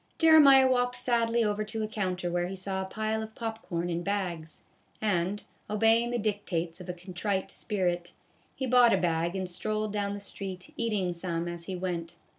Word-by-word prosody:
Jeremiah 290 Hz, -5 st, +8 dB
walked 245 Hz, -1 st, +2 dB
sadly 235 Hz, -1 st, +2 dB
over 210 Hz, 0 st, 0 dB
to 220 Hz, +1 st, -4 dB
a -, -, -1 dB
counter 185 Hz, -4 st, -2 dB
where 175 Hz, 0 st, 0 dB
he 190 Hz, -, -5 dB
saw 190 Hz, 0 st, -3 dB
a -, -, -3 dB
pile 215 Hz, +3 st, -2 dB
of 220 Hz, 0 st, -8 dB
pop 225 Hz, -1 st, -4 dB
corn 170 Hz, -1 st, -3 dB
in 170 Hz, -1 st, -2 dB
bags, 175 Hz, -5 st, -3 dB, 0.4 s
and, 200 Hz, -1 st, 0 dB, 0.3 s
obeying 225 Hz, +3 st, +3 dB
the 240 Hz, -, -1 dB
dictates 190 Hz, -6 st, -2 dB
of 180 Hz, -, -10 dB
a -, -, -1 dB
contrite 185 Hz, +2 st, -3 dB
spirit, 175 Hz, -4 st, -2 dB, 0.4 s
he 265 Hz, -, -2 dB
bought 245 Hz, -2 st, +6 dB
a -, -, +1 dB
bag 170 Hz, 0 st, 0 dB
and 190 Hz, -1 st, -2 dB
strolled 215 Hz, +3 st, -2 dB
down 200 Hz, -1 st, -1 dB
the -, -, -6 dB
street 190 Hz, -2 st, -6 dB
eating 210 Hz, -6 st, 0 dB
some 170 Hz, -1 st, -3 dB
as 170 Hz, -1 st, -5 dB
he 190 Hz, -, -4 dB
went. 175 Hz, -2 st, -4 dB
200 Hz, 190 wpm, -29 LUFS, 175-220 Hz, 0.4 s, Jeremiah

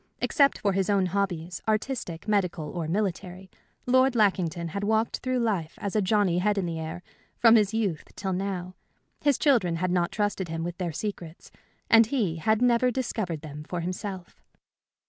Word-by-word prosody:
Except 280 Hz, -3 st, +3 dB
for 200 Hz, -2 st, 0 dB
his 195 Hz, 0 st, 0 dB
own 200 Hz, -2 st, +3 dB
hobbies, 180 Hz, -2 st, -2 dB
artistic, 215 Hz, -6 st, -2 dB
medical, 180 Hz, -7 st, 0 dB
or 170 Hz, -3 st, -4 dB
military, 185 Hz, 0 st, -3 dB, 0.3 s
Lord 260 Hz, +1 st, +4 dB
Lackington 180 Hz, -6 st, +1 dB
had 200 Hz, +5 st, -4 dB
walked 220 Hz, +2 st, +1 dB
through 255 Hz, 0 st, -2 dB
life 200 Hz, -9 st, -1 dB
as 200 Hz, 0 st, -4 dB
a 215 Hz, -, +3 dB
Johnny 190 Hz, -3 st, +2 dB
Head 205 Hz, +2 st, +1 dB
in 190 Hz, -3 st, 0 dB
Air, 165 Hz, +1 st, -5 dB, 0.3 s
from 230 Hz, -1 st, +6 dB
his 210 Hz, -3 st, +4 dB
youth 210 Hz, -8 st, -1 dB
till 190 Hz, -1 st, -3 dB
now. 185 Hz, -1 st, -3 dB, 0.5 s
His 285 Hz, -3 st, +3 dB
children 225 Hz, -, +3 dB
had 180 Hz, +2 st, -1 dB
not 175 Hz, -1 st, +1 dB
trusted 205 Hz, -3 st, -1 dB
him 165 Hz, 0 st, -4 dB
with 175 Hz, +2 st, -5 dB
their 175 Hz, -2 st, -2 dB
secrets, 175 Hz, -2 st, -6 dB, 0.4 s
and 225 Hz, -1 st, +6 dB
he 215 Hz, -, 0 dB
had 220 Hz, +8 st, +1 dB
never 245 Hz, 0 st, +4 dB
discovered 220 Hz, -, -3 dB
them 150 Hz, -1 st, -8 dB
for 175 Hz, +2 st, -4 dB
himself. 185 Hz, +1 st, -6 dB
195 Hz, 170 wpm, -27 LUFS, 175-220 Hz, 0.5 s, from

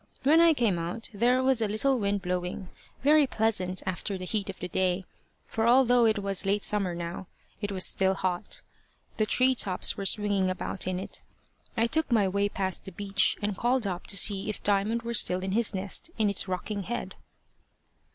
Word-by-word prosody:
When 315 Hz, +4 st, +5 dB
I 335 Hz, -2 st, +5 dB
came 220 Hz, -9 st, +1 dB
out, 175 Hz, +9 st, -5 dB
there 245 Hz, +5 st, +2 dB
was 260 Hz, -3 st, +3 dB
a 220 Hz, -, +1 dB
little 250 Hz, +5 st, +1 dB
wind 200 Hz, -1 st, -1 dB
blowing, 180 Hz, 0 st, -4 dB, 0.3 s
very 295 Hz, 0 st, +5 dB
pleasant 200 Hz, -6 st, 0 dB
after 190 Hz, +2 st, -3 dB
the 185 Hz, -, -7 dB
heat 205 Hz, 0 st, -2 dB
of 190 Hz, -, -6 dB
the 180 Hz, -, -5 dB
day, 185 Hz, +1 st, -1 dB, 0.4 s
for 225 Hz, 0 st, -1 dB
although 245 Hz, -1 st, +5 dB
it 220 Hz, -1 st, +1 dB
was 195 Hz, -1 st, -2 dB
late 200 Hz, +1 st, 0 dB
summer 195 Hz, -4 st, +1 dB
now, 170 Hz, +2 st, -6 dB, 0.3 s
it 205 Hz, -1 st, -3 dB
was 190 Hz, -1 st, +3 dB
still 190 Hz, 0 st, +1 dB
hot. 185 Hz, -, -3 dB, 0.5 s
The 215 Hz, -1 st, +1 dB
tree 260 Hz, +3 st, +3 dB
tops 190 Hz, -7 st, 0 dB
were 195 Hz, -, -1 dB
swinging 200 Hz, -2 st, +1 dB
about 185 Hz, 0 st, -3 dB
in 185 Hz, -1 st, -2 dB
it. 190 Hz, -, -7 dB, 0.6 s
I 225 Hz, -, +3 dB
took 315 Hz, +3 st, 0 dB
my 215 Hz, -4 st, +3 dB
way 200 Hz, +2 st, 0 dB
past 190 Hz, -2 st, -3 dB
the 195 Hz, -, -7 dB
beech, 200 Hz, +2 st, 0 dB
and 205 Hz, -1 st, -1 dB
called 245 Hz, +2 st, 0 dB
up 180 Hz, -2 st, -4 dB
to 195 Hz, -, +2 dB
see 195 Hz, +2 st, +3 dB
if 210 Hz, -, -6 dB
Diamond 210 Hz, +3 st, +1 dB
were 235 Hz, 0 st, -4 dB
still 185 Hz, -4 st, +2 dB
in 190 Hz, -, -3 dB
his 225 Hz, +2 st, +2 dB
nest 190 Hz, -, -1 dB
in 215 Hz, -2 st, +2 dB
its 200 Hz, -, +1 dB
rocking 195 Hz, +3 st, -4 dB
head. 240 Hz, +5 st, -5 dB
200 Hz, 200 wpm, -27 LUFS, 185-230 Hz, 0.6 s, When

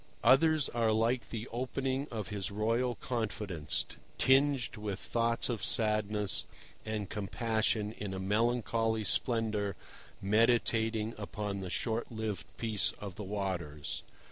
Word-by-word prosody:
Others 155 Hz, +2 st, +5 dB
are 115 Hz, -2 st, +2 dB
like 115 Hz, +3 st, +1 dB
the 115 Hz, +1 st, -4 dB
opening 130 Hz, +3 st, -2 dB
of 110 Hz, -1 st, -4 dB
his 100 Hz, -3 st, -2 dB
royal 115 Hz, +4 st, +1 dB
confidence, 105 Hz, -10 st, -2 dB, 0.3 s
tinged 135 Hz, -2 st, +3 dB
with 105 Hz, -3 st, -4 dB
thoughts 115 Hz, 0 st, 0 dB
of 120 Hz, -4 st, -2 dB
sadness 105 Hz, -3 st, +2 dB, 0.4 s
and 110 Hz, -2 st, -3 dB
compassion 110 Hz, +1 st, 0 dB
in 105 Hz, -3 st, -5 dB
a 95 Hz, -, -4 dB
melancholy 115 Hz, +2 st, +1 dB
splendour 105 Hz, -1 st, +1 dB, 0.4 s
meditating 110 Hz, +1 st, +2 dB
upon 105 Hz, -1 st, -3 dB
the 95 Hz, -1 st, -4 dB
short 115 Hz, +6 st, -1 dB
lived 110 Hz, -3 st, -3 dB
peace 110 Hz, -3 st, +1 dB
of 100 Hz, -2 st, -6 dB
the 105 Hz, -, -6 dB
waters. 90 Hz, -8 st, -3 dB
110 Hz, 120 wpm, -32 LUFS, 105-115 Hz, 0.4 s, Others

